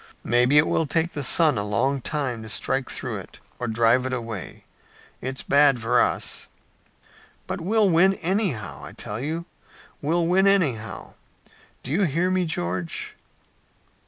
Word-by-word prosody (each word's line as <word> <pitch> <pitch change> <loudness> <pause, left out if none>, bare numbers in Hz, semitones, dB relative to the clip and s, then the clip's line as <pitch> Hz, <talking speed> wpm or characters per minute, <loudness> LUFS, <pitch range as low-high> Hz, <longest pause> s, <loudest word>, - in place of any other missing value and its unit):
Maybe 125 +4 +3
it 150 - +6
will 160 - 0
take 165 +4 0
the 145 - -3
sun 150 -2 +5
a - - -1
long 125 +7 0
time 130 -5 -2
to 110 - -8
strike - - 0
through - - -4
it - - -11 0.2
or 120 - -3
drive 115 +2 +3
it 130 - -4
away. 115 -6 -6 0.6
It's 130 +1 -5
bad 140 -3 +4
for 120 +2 +2
us." - - -1 1.0
"But - - -5
we'll 210 +4 +2
win 190 +2 +4
anyhow. 165 - -2
I 75 - -9
tell 105 -1 -5
you, 160 +5 -3 0.6
we'll 165 +4 +1
win 190 +3 +3
anyhow! 140 - 0 0.7
Do 130 - -5
you 190 +6 +2
hear 170 +4 0
me, 185 -1 +1
George?" 90 - -3
140 Hz, 155 wpm, -24 LUFS, 115-170 Hz, 1.0 s, it